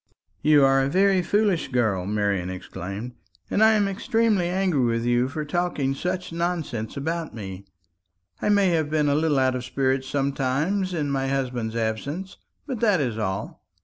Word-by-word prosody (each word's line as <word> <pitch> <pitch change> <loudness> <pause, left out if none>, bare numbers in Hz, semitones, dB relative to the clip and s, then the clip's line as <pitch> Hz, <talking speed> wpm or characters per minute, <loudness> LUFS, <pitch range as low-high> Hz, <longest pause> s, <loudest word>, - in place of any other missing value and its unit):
"You 150 -2 +5
are 135 0 +4
a 135 - 0
very 190 +3 +3
foolish 200 -1 +1
girl," 110 -8 0
Marian 100 -3 0
exclaimed; 95 +5 -6 0.4
"and 215 - +3
I 220 0 +6
am 205 -2 +2
extremely 210 -2 +1
angry 180 -7 +1
with 115 -1 0
you 120 +1 +2
for 150 +3 -4
talking 150 -4 -1
such 180 +5 -3
utter 165 - -7
nonsense 160 -11 -2
about 160 +2 -3
me. 95 -3 -7 0.8
I - - +1
may 200 -2 +4
have 160 -3 +1
been 150 -1 +1
a - - +3
little 150 -1 +2
out 130 -1 +3
of 125 -1 -3
spirits 130 0 0
sometimes 145 +7 0
in 145 -3 -1
my 135 -1 0
husband's 125 -4 -2
absence; 140 - -3 0.3
but 260 -6 -4
that 210 -6 +3
is 120 -6 -1
all. 95 -2 -3
140 Hz, 175 wpm, -24 LUFS, 120-180 Hz, 0.8 s, I